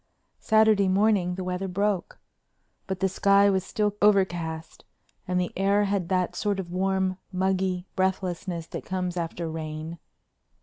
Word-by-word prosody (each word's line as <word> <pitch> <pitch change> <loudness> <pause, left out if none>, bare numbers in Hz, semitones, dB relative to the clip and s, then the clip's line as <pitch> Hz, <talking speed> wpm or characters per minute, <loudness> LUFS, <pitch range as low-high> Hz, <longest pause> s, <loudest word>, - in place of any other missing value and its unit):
Saturday 220 -3 +4
morning 190 -2 +2
the 190 - -4
weather 180 +1 -3
broke. 200 0 -1 0.7
But 190 -2 -4
the 190 - +3
sky 200 +1 +4
was 190 -1 +1
still 210 0 -1
overcast 175 -6 +1 0.4
and 180 0 +1
the 180 - -2
air 200 +2 +2
had 195 -3 -1
that 185 -2 0
sort 205 -2 -1
of 175 -2 -6
warm, 190 0 0
muggy 185 -1 0
breathlessness 185 -2 -1
that - - -7
comes 180 -1 -3
after 170 -1 -3
rain. 160 +1 -6
185 Hz, 140 wpm, -26 LUFS, 180-200 Hz, 0.7 s, Saturday